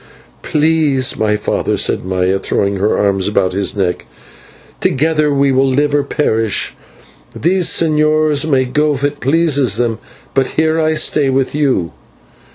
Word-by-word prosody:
"Peace, 150 -4 +1
my 105 -1 0
father," 105 - -2
said - - 0
Maya, 95 +1 -1
throwing 100 +1 -1
her 105 +3 0
arms 100 -2 0
about 95 -3 0
his 100 +2 -1
neck, 95 -3 -2 0.7
"together 155 +1 +1
we 140 -1 +2
will 135 +1 +2
live 145 +2 0
or 145 - +3
perish. 115 -7 -1 0.6
These 180 +1 +1
señors 155 -1 +1
may 130 -3 +2
go 150 +4 0
if 135 - -6
it 145 0 -1
pleases 145 - +2
them, 115 -2 -1 0.3
but 135 -1 +1
here 160 +1 +2
I 155 0 +1
stay 150 -2 +1
with 130 0 0
you." 135 - 0
135 Hz, 150 wpm, -15 LUFS, 110-155 Hz, 0.7 s, or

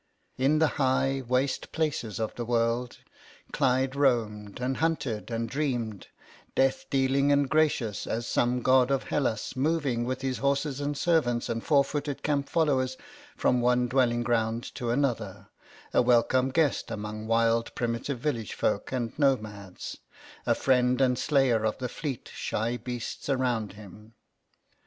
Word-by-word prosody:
In 140 +4 +3
the 160 - +4 0.2
high 135 +1 +2
waste 130 +2 0
places 145 -10 -2
of 110 -1 -2
the 120 - -4
world 120 +1 0 0.5
Clyde 130 0 +1
roamed 110 -7 0
and 130 +1 -1
hunted 140 -10 -1
and 115 0 -2
dreamed, 120 -6 -2 0.5
death 135 0 +1
dealing 135 +1 +2
and 140 -1 +3
gracious 140 -8 +1
as 115 +1 -2
some 120 0 +1
god 130 -1 +4
of 135 -1 +1
Hellas, 125 -5 -1
moving 140 -4 0
with 130 +2 -3
his 130 -1 -2
horses 140 0 0
and 145 0 -2
servants 140 -9 +1
and 115 -1 -2
four 140 -3 +4
footed 145 0 -4
camp 140 -2 0
followers 130 -5 +1 0.4
from 125 - +2
one 125 0 +3
dwelling 120 -2 +2
ground 115 0 0
to 120 -3 -4
another, 115 -6 -1 0.4
a - - +5
welcome 125 +1 +3
guest 150 -1 +1
among 105 +1 -5
wild 115 0 +2
primitive 120 +3 -2
village 120 -6 -3
folk - - -1
and 120 -3 -2
nomads, 105 -9 -1 0.5
a - - +4
friend 125 -1 +2
and 125 -2 +2
slayer 135 -7 +2
of 110 -1 0
the 130 - -3
fleet, 140 -2 -5
shy 115 +3 -2
beasts 120 +2 -6
around 125 -6 0
him. 105 +2 -14
125 Hz, 145 wpm, -28 LUFS, 115-140 Hz, 0.5 s, a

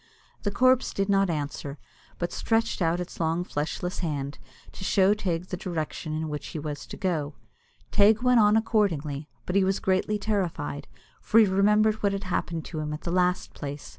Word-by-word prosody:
The 205 - 0
corpse 255 +5 +3
did 195 0 0
not 195 -1 +3
answer, 145 -2 -3 0.4
but 175 - -2
stretched 225 -3 0
out 170 +1 +2
its 180 - -6
long 165 +1 +1
fleshless 180 +3 -3
hand, 145 -4 -3 0.3
to - - -9
show 190 +1 +4
Teig 180 -4 -2
the 180 - -3
direction 160 -2 -4
in 160 0 -2
which 150 -1 -5
he - - -6
was 150 -1 -5
to - - -8
go. 155 -6 -1 0.6
Teig 215 +3 +5
went 250 -1 +5
on 210 0 +5
accordingly, 160 -10 0 0.2
but 180 - -3
he 200 - +5
was 190 +1 +1
greatly 190 +3 +1
terrified, 185 - -2 0.3
for 225 - +4
he 220 - +7
remembered 210 +3 +3
what 200 -1 +2
had 195 0 -3
happened 170 -3 -2
to 160 - -5
him 150 0 -3
at 150 - -6
the 170 - -3
last 180 0 +1
place. 145 0 -6
180 Hz, 190 wpm, -27 LUFS, 155-205 Hz, 0.6 s, he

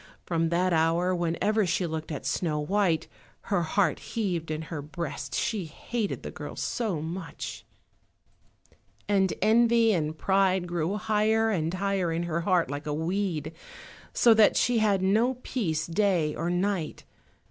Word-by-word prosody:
From 165 -1 0
that 180 +2 +1
hour, 165 +3 +2
whenever 175 +5 +1
she 180 +2 0
looked 160 -1 -4
at 150 - -5
Snow 155 -4 -1
white, 170 -1 +1 0.5
her 185 - +3
heart 185 +4 +1
heaved 180 -8 -3
in 155 0 -3
her 155 -2 -5
breast, 145 -3 -5
she 205 -6 -1
hated 210 +7 -4
the - - -5
girl - - -8
so 215 -9 -2
much. 165 +2 -6 1.4
And 195 -2 +2
envy 230 +1 +4
and 155 -3 -1
pride 190 -1 +2
grew 175 +3 -1
higher 220 +1 +2
and 165 -5 0
higher 190 -2 0
in 165 +1 -1
her 170 -1 -1
heart 175 -3 +1
like 145 +2 -5
a 150 - -1
weed, 165 -2 -2 0.6
so 235 - +5
that 220 -1 +5
she 245 -1 +3
had 200 -3 +2
no 225 +7 +3
peace 160 -11 -1
day 170 -3 +1
or 170 +2 -2
night. 180 -2 -1
180 Hz, 150 wpm, -27 LUFS, 160-205 Hz, 1.4 s, so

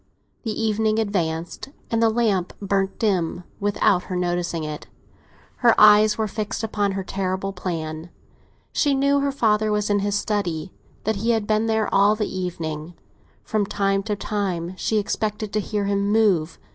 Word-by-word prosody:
The 220 -3 -4
evening 220 0 +1
advanced, 175 -4 -2 0.2
and 230 0 +1
the 225 - +5
lamp 215 -6 +1
burned 195 -1 -1
dim 180 -5 0 0.2
without 200 -2 +2
her 185 - -4
noticing 175 -2 -1
it; 150 -1 -6 0.7
her 235 -2 +4
eyes 210 0 +7
were 220 -1 0
fixed 215 +2 -4
upon 205 -2 0
her 195 0 -3
terrible 190 +1 -2
plan. 165 -3 -4 0.6
She 285 -2 +2
knew 280 +1 +3
her 280 0 0
father 215 -5 +2
was 210 0 0
in 205 - +3
his 205 0 0
study—that 200 +1 -3
he 225 +4 -1
had 225 -3 +2
been 215 +1 +1
there 220 -1 +1
all 200 +2 +5
the 210 -1 -1
evening; 165 -3 -4 0.5
from 215 -3 -1
time 195 -1 +1
to 210 - +1
time 190 -4 -2
she 215 +3 0
expected 210 0 -2
to 215 - +2
hear 205 0 -2
him 200 0 0
move. 195 -8 +2
205 Hz, 160 wpm, -23 LUFS, 180-215 Hz, 0.7 s, eyes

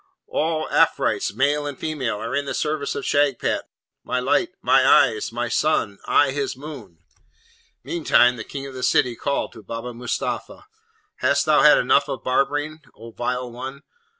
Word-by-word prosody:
all 155 0 -1
Afrites, - - +2
male 145 +4 +1
and 145 -2 -6
female, 145 -8 -3
are 115 +2 -4
in 140 0 -1
the - - -4
service 150 -2 -2
of - - -4
Shagpat, 145 -3 +1 0.4
my 125 - -1
light, 180 +8 +1
my 135 - +4
eyes, 115 -5 +4
my 120 +1 -2
sun! 115 -6 0
I 145 -2 +4
his 140 -2 -3
moon!' 130 - -10 0.9
Meantime 125 -7 +3
the 110 - -5
King 135 +3 -7
of 135 - -8
the 130 - -7
City 125 -1 +2
called 140 +4 -2
to 110 - -12
Baba 115 +4 -6
Mustapha, 125 - -4 0.5
'Hast - - +2
thou - - +4
had - - +7
enough - - +3
of - - -5
barbering, 145 +4 0 0.2
O 115 +1 -11
vile 125 +1 -3
one? 130 +4 -8
135 Hz, 165 wpm, -22 LUFS, 120-145 Hz, 0.9 s, had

